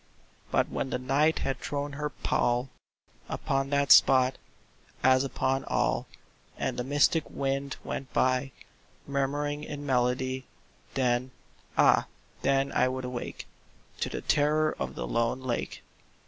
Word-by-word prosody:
But -, -, +2 dB
when 135 Hz, -, -3 dB
the 125 Hz, -, -1 dB
Night 140 Hz, +5 st, +2 dB
had 135 Hz, -1 st, -2 dB
thrown 145 Hz, 0 st, -3 dB
her 150 Hz, +1 st, -3 dB
pall 125 Hz, -1 st, 0 dB, 0.6 s
Upon 135 Hz, 0 st, -1 dB
that 140 Hz, -2 st, +2 dB
spot, 130 Hz, -1 st, +6 dB, 0.6 s
as 130 Hz, +1 st, +5 dB
upon 135 Hz, 0 st, -1 dB
all, -, -, 0 dB, 0.5 s
And -, -, -2 dB
the 125 Hz, -, -2 dB
mystic 145 Hz, +4 st, +2 dB
wind 140 Hz, 0 st, -2 dB
went 135 Hz, -, -5 dB
by 130 Hz, +1 st, +1 dB, 0.5 s
Murmuring 145 Hz, +2 st, -1 dB
in 145 Hz, -1 st, -6 dB
melody— 130 Hz, 0 st, 0 dB, 0.5 s
Then—ah 125 Hz, 0 st, +1 dB, 0.3 s
then 135 Hz, 0 st, +2 dB
I 125 Hz, -, +3 dB
would 130 Hz, 0 st, -3 dB
awake 125 Hz, -1 st, -5 dB, 0.5 s
To -, -, -1 dB
the -, -, -4 dB
terror 155 Hz, +1 st, +2 dB
of -, -, -3 dB
the -, -, -4 dB
lone 115 Hz, -, 0 dB
lake. 125 Hz, -2 st, -3 dB
135 Hz, 130 wpm, -28 LUFS, 130-140 Hz, 0.6 s, spot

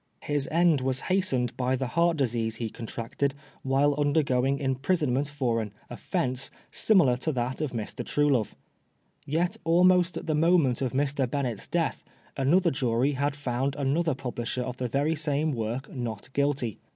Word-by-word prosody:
His 145 Hz, -1 st, -1 dB
end 165 Hz, -3 st, +3 dB
was 130 Hz, 0 st, -1 dB
hastened 130 Hz, -11 st, +1 dB
by 130 Hz, 0 st, 0 dB
the 130 Hz, +1 st, -2 dB
heart 170 Hz, +3 st, +2 dB
disease 115 Hz, -4 st, 0 dB
he 115 Hz, -1 st, -4 dB
contracted 120 Hz, +4 st, -3 dB, 0.3 s
while 135 Hz, +2 st, +2 dB
undergoing 140 Hz, -3 st, +2 dB
im 135 Hz, -1 st, 0 dB
prisonment 140 Hz, -2 st, +1 dB
for 130 Hz, -6 st, -1 dB
an 105 Hz, -2 st, -6 dB, 0.2 s
"offence 130 Hz, +1 st, -1 dB
" -, -, -35 dB, 0.2 s
similar 170 Hz, -, +5 dB
to 155 Hz, +5 st, -1 dB
that 125 Hz, +3 st, -2 dB
of 150 Hz, -4 st, -1 dB
Mr. 115 Hz, -3 st, -4 dB
Truelove. 140 Hz, -7 st, +1 dB, 0.7 s
Yet 165 Hz, +5 st, 0 dB
almost 180 Hz, +1 st, +4 dB
at -, -, -6 dB
the 155 Hz, -, 0 dB
moment 150 Hz, -5 st, +3 dB
of 130 Hz, -2 st, -1 dB
Mr. 135 Hz, -1 st, 0 dB
Bennett's 125 Hz, -6 st, -3 dB
death, -, -, -1 dB, 0.3 s
another 170 Hz, +6 st, +3 dB
jury 130 Hz, 0 st, +1 dB
had 140 Hz, +1 st, -1 dB
found 135 Hz, -1 st, -2 dB
another 145 Hz, +2 st, 0 dB
publisher 125 Hz, -1 st, -3 dB
of 125 Hz, 0 st, -5 dB
the 125 Hz, -, -2 dB
very 145 Hz, +6 st, 0 dB
same 150 Hz, 0 st, 0 dB
work 120 Hz, +2 st, -4 dB
Not 120 Hz, 0 st, -5 dB
Guilty. 140 Hz, -6 st, 0 dB
135 Hz, 165 wpm, -27 LUFS, 125-150 Hz, 0.7 s, similar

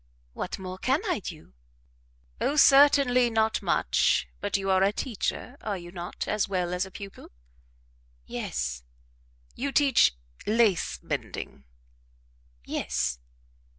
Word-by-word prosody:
"What -, -, -4 dB
more 185 Hz, 0 st, -7 dB
can 265 Hz, +8 st, +1 dB
I 360 Hz, -6 st, 0 dB
do?" 160 Hz, -, -9 dB, 0.9 s
"Oh, 290 Hz, -, +1 dB
certainly, 275 Hz, -4 st, +6 dB
not 220 Hz, -1 st, +1 dB
much; -, -, +2 dB
but 205 Hz, 0 st, 0 dB
you 195 Hz, 0 st, -1 dB
are 190 Hz, 0 st, +4 dB
a 195 Hz, +1 st, +4 dB
teacher, 245 Hz, +3 st, -3 dB
are 205 Hz, -3 st, -3 dB
you 175 Hz, -1 st, -10 dB
not, 175 Hz, -1 st, -6 dB
as 210 Hz, -2 st, 0 dB
well 180 Hz, -2 st, -1 dB
as 180 Hz, +1 st, -1 dB
a -, -, -11 dB
pupil?" 195 Hz, +1 st, -10 dB, 1.0 s
"Yes." -, -, -4 dB, 0.7 s
"You 280 Hz, +2 st, -3 dB
teach 270 Hz, -, +4 dB, 0.3 s
lace 215 Hz, -4 st, +2 dB
mending?" 70 Hz, -, -5 dB, 1.0 s
"Yes." 60 Hz, -1 st, -2 dB
200 Hz, 120 wpm, -27 LUFS, 180-250 Hz, 1.0 s, certainly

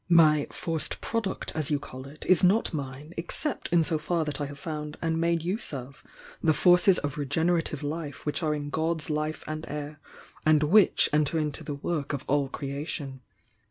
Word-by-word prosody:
"My 155 Hz, -4 st, +5 dB
'forced 165 Hz, -2 st, -2 dB
product' 225 Hz, -4 st, -2 dB
as 155 Hz, -3 st, -1 dB
you 150 Hz, -, +2 dB
call 130 Hz, -1 st, -9 dB
it, 145 Hz, +2 st, -11 dB
is 185 Hz, -1 st, +4 dB
not 195 Hz, +3 st, +3 dB
mine, 140 Hz, +2 st, -6 dB
except 210 Hz, -, -1 dB
in 170 Hz, -1 st, +5 dB
so 160 Hz, 0 st, +2 dB
far 165 Hz, +1 st, 0 dB
that 150 Hz, -1 st, -3 dB
I 145 Hz, -, -1 dB
have 145 Hz, 0 st, -9 dB
found 150 Hz, 0 st, -5 dB
and 165 Hz, 0 st, 0 dB
made 170 Hz, -1 st, +1 dB
use 190 Hz, +1 st, -1 dB
of 135 Hz, 0 st, -7 dB, 0.4 s
tiie 155 Hz, -2 st, +4 dB
forces 180 Hz, +3 st, +6 dB
of 145 Hz, 0 st, -3 dB
regenerative 160 Hz, +3 st, 0 dB
life 145 Hz, -1 st, -5 dB
which 150 Hz, +3 st, 0 dB
are 155 Hz, -2 st, +1 dB
in 145 Hz, -1 st, -5 dB
God's 160 Hz, -1 st, -1 dB
life 155 Hz, +1 st, -2 dB
and 155 Hz, 0 st, -5 dB
air 150 Hz, +1 st, -5 dB, 0.4 s
and 155 Hz, -1 st, +4 dB
which 195 Hz, +7 st, +5 dB
enter 150 Hz, +1 st, +2 dB
into 150 Hz, -2 st, -2 dB
the 145 Hz, -, -4 dB
work 145 Hz, -1 st, -3 dB
of 140 Hz, -, -4 dB
all 140 Hz, -1 st, +1 dB
creation. 140 Hz, -1 st, -5 dB
155 Hz, 190 wpm, -27 LUFS, 145-165 Hz, 0.4 s, forces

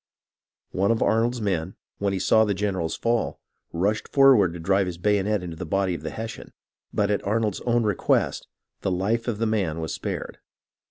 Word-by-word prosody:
One 95 Hz, +2 st, +1 dB
of 115 Hz, -, +2 dB
Arnold's 115 Hz, +2 st, +1 dB
men, 95 Hz, -3 st, -1 dB, 0.2 s
when 100 Hz, 0 st, 0 dB
he 95 Hz, -, -1 dB
saw 110 Hz, +4 st, +4 dB
the 105 Hz, -2 st, 0 dB
general 95 Hz, -4 st, -1 dB
fall, 115 Hz, +6 st, -1 dB, 0.3 s
rushed 100 Hz, +6 st, 0 dB
forward 135 Hz, -10 st, +5 dB
to 85 Hz, -, -7 dB
drive 95 Hz, +3 st, +2 dB
his 90 Hz, -2 st, -5 dB
bayonet 105 Hz, +1 st, +1 dB
into 85 Hz, -2 st, -6 dB
the -, -, -6 dB
body 95 Hz, +1 st, +1 dB
of 85 Hz, -, -5 dB
the -, -, -4 dB
Hes 115 Hz, 0 st, -5 dB
sian; -, -, -12 dB, 0.4 s
but 105 Hz, 0 st, +1 dB
at 105 Hz, -, 0 dB
Arnold's 105 Hz, -1 st, 0 dB
own 120 Hz, 0 st, +3 dB
request 105 Hz, -4 st, 0 dB, 0.3 s
the -, -, -1 dB
life 105 Hz, +6 st, 0 dB
of 115 Hz, -4 st, -1 dB
the 115 Hz, -, 0 dB
man 95 Hz, -8 st, 0 dB
was 80 Hz, -2 st, -3 dB
spared. -, -, -5 dB
100 Hz, 195 wpm, -25 LUFS, 90-110 Hz, 0.4 s, forward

